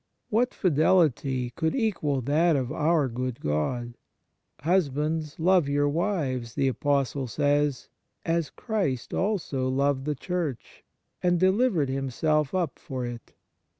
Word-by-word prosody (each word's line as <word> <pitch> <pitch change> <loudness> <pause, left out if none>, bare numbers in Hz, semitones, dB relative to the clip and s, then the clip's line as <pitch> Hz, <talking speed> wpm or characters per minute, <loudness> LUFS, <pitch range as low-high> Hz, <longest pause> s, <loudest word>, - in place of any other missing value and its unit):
What 240 +4 +2
fidelity 145 -7 +2
could 160 +6 -1
equal 170 - 0
that 155 +6 +3
of 130 -3 -1
our 155 -2 +2
good 125 0 -4
God? 120 - -2 0.3
" - - -35
Husbands, 155 -2 0
love 175 -3 +3
your 145 0 +2
wives," 145 - -1
the 140 -2 +2
Apostle 140 -1 0
says, 145 +2 0 0.2
" - - -48
as 165 -4 -1
Christ 185 - -2
also 165 -10 -1
loved 135 0 +1
the 150 -1 -1
Church, 165 -3 -4 0.4
and 175 -1 +2
delivered 190 - +2
Himself 135 +3 0
up 175 -6 -1
for 130 -5 -5
it." 120 -1 -8
145 Hz, 130 wpm, -27 LUFS, 130-170 Hz, 0.4 s, that